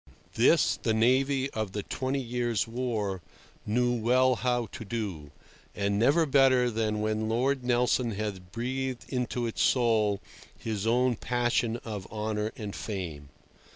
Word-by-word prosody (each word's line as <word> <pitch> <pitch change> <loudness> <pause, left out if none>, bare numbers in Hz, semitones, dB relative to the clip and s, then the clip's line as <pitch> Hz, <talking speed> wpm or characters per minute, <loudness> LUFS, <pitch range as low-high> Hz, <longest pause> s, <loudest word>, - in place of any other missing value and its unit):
This - - +4
the 110 - 0
navy 130 +4 +3
of 110 -3 -3
the 105 - -3
Twenty 130 +5 -2
Years' 120 -2 -1
War 115 -6 -2 0.5
knew 120 +3 +2
well 125 +3 +3
how 120 -1 0
to 125 - -7
do, 100 -9 -4 0.5
and 100 0 0
never 145 +8 +4
better 130 -3 +4
than 110 -1 -1
when 110 0 -1
Lord 130 +3 +1
Nelson 125 -1 +1
had 100 -3 -5
breathed 130 +2 -3
into 125 -2 -2
its 115 - -2
soul 110 -5 +3 0.4
his 110 -1 -3
own 125 0 +2
passion 120 -1 0
of 105 -4 -6
honour 105 0 -2
and 105 -4 -6
fame. 85 -9 -5
115 Hz, 140 wpm, -28 LUFS, 105-125 Hz, 0.5 s, This